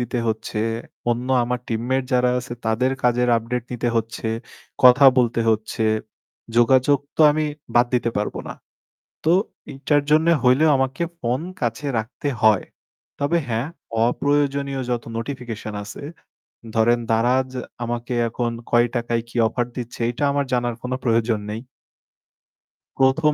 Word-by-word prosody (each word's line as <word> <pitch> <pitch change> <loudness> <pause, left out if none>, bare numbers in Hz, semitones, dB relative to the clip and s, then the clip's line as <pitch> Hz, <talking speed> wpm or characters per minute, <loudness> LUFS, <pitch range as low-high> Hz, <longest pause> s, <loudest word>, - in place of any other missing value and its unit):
দিতে 120 +1 -2
হচ্ছে। 110 0 -3 0.5
অন্য 120 +2 -2 0.2
আমার 125 +1 -1
টিমমেট 120 +4 0
যারা 125 0 +3
আছে 125 0 -7
তাদের 125 +4 +1
কাজের 125 0 +2
আপডেট 115 +2 -2
নিতে 120 0 -1
হচ্ছে। 115 0 -2 0.6
কথা 130 +2 +8
বলতে 120 -1 +2
হচ্ছে। 110 0 -1 0.7
যোগাযোগ 130 +4 +4 0.2
তো - - -1
আমি 155 +1 0 0.3
বাদ 120 +1 +5
দিতে 120 -1 +1
পারবো 105 0 -2
না। - - -6 0.7
তো 160 - +4 0.4
এটার 145 +2 +1
জন্য 155 +2 +4 0.2
হইলেও 130 +5 +5
আমাকে 135 +5 -1 0.2
ফোন 125 0 -1 0.2
কাছে 120 +5 -2
রাখতে 110 +6 -4 0.2
হয়। 110 -3 +5 0.6
তবে 165 +4 +2
হ্যাঁ 115 +5 -1 0.4
অপ্রয়োজনীয় 140 0 0
যত 120 -2 -1
নোটিফিকেশন 115 -4 -5
আছে, 100 - -9 0.7
ধরেন 120 +2 +3
Daraz 125 +3 +2 0.3
আমাকে 120 +1 -3 0.2
এখন 120 +1 -2 0.2
কয় 120 0 +4
টাকায় 120 -1 0
কি - - -18
অফার 120 +2 -1
দিচ্ছে 120 -2 -6
এইটা 125 +4 -3
আমার 140 0 0
জানার 120 -1 0
কোনো 125 +1 -2
প্রয়োজন 115 -2 +1
নেই 110 +2 -4 1.4
প্রথম 135 +3 +3
125 Hz, 135 wpm, -22 LUFS, 115-135 Hz, 1.4 s, কথা